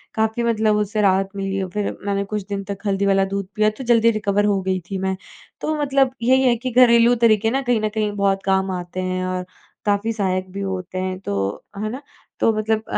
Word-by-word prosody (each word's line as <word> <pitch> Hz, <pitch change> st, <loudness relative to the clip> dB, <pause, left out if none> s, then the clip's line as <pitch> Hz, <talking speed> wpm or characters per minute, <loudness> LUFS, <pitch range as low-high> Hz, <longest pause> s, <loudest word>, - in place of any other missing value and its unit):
काफ़ी 220 Hz, +2 st, 0 dB
मतलब 220 Hz, -2 st, +2 dB
उससे 210 Hz, +1 st, 0 dB
राहत 195 Hz, -1 st, +3 dB
मिली 195 Hz, 0 st, -2 dB
और 185 Hz, -, -5 dB
फिर 210 Hz, 0 st, -1 dB, 0.2 s
मैंने 200 Hz, 0 st, 0 dB
कुछ 210 Hz, -1 st, -4 dB
दिन 200 Hz, -1 st, -3 dB
तक 200 Hz, -1 st, -5 dB
हल्दी 195 Hz, 0 st, +1 dB
वाला 195 Hz, -1 st, +3 dB
दूध 200 Hz, -1 st, -2 dB
पिया 215 Hz, 0 st, +3 dB
तो -, -, -6 dB
जल्दी 230 Hz, -1 st, +4 dB
रिकवर 205 Hz, -1 st, 0 dB
हो 200 Hz, -2 st, +2 dB
गई 185 Hz, 0 st, -1 dB
थी। 195 Hz, -, -2 dB
मैं 190 Hz, 0 st, -1 dB, 0.5 s
तो 310 Hz, -, -1 dB
मतलब 275 Hz, -2 st, +2 dB
यही 260 Hz, +2 st, +4 dB
है 245 Hz, -2 st, +4 dB
कि 255 Hz, +2 st, -4 dB
घरेलू 235 Hz, -1 st, +6 dB
तरीके 225 Hz, -1 st, +3 dB
ना 270 Hz, +2 st, 0 dB
कहीं 245 Hz, -4 st, +1 dB
न 215 Hz, -, 0 dB
कहीं 210 Hz, -1 st, -1 dB
बहुत 195 Hz, -1 st, +1 dB
काम 190 Hz, 0 st, +1 dB
आते 180 Hz, 0 st, -4 dB
हैं 185 Hz, 0 st, -2 dB
और 185 Hz, 0 st, -2 dB, 0.4 s
काफ़ी 205 Hz, +2 st, +1 dB
सहायक 185 Hz, -3 st, -1 dB
भी 200 Hz, +1 st, -5 dB
होते 185 Hz, -1 st, -4 dB
हैं 185 Hz, 0 st, -3 dB
तो 100 Hz, -, -3 dB
है 215 Hz, +1 st, -2 dB
ना? 255 Hz, +5 st, -6 dB, 0.4 s
तो -, -, +4 dB
मतलब 220 Hz, 0 st, 0 dB
205 Hz, 220 wpm, -21 LUFS, 190-225 Hz, 0.5 s, घरेलू